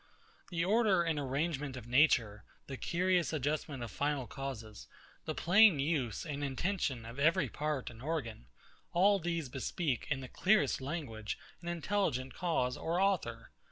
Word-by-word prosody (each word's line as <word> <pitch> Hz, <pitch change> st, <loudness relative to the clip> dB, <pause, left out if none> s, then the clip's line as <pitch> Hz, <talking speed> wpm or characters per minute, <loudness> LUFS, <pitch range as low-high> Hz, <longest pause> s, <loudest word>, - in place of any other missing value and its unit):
The 170 Hz, -1 st, 0 dB
order 205 Hz, -3 st, +3 dB
and 165 Hz, -3 st, 0 dB
arrangement 140 Hz, 0 st, -2 dB
of 120 Hz, -, -8 dB
nature, 120 Hz, -5 st, +3 dB, 0.2 s
the 135 Hz, -, -6 dB
curious 180 Hz, +4 st, +1 dB
adjustment 145 Hz, -2 st, -2 dB
of 115 Hz, -, -6 dB
final 145 Hz, 0 st, -1 dB
causes, 115 Hz, -6 st, -7 dB, 0.4 s
the -, -, -3 dB
plain 195 Hz, 0 st, +6 dB
use 140 Hz, -5 st, -1 dB
and 145 Hz, -2 st, -4 dB
intention 140 Hz, -, -1 dB
of 115 Hz, +4 st, -8 dB
every 160 Hz, -1 st, +3 dB
part 150 Hz, -1 st, -2 dB
and 115 Hz, 0 st, -13 dB
organ; 130 Hz, -, -4 dB, 0.5 s
all 195 Hz, +3 st, +5 dB
these 170 Hz, -3 st, -2 dB
bespeak 130 Hz, +1 st, -2 dB
in 140 Hz, -3 st, 0 dB
the 130 Hz, -, -7 dB
clearest 210 Hz, +1 st, +2 dB
language 130 Hz, -8 st, -4 dB, 0.2 s
an 170 Hz, -, -9 dB
intelligent 165 Hz, -7 st, -1 dB
cause 145 Hz, -8 st, 0 dB
or 170 Hz, +2 st, -1 dB
author. 170 Hz, -13 st, 0 dB
145 Hz, 150 wpm, -33 LUFS, 130-175 Hz, 0.5 s, plain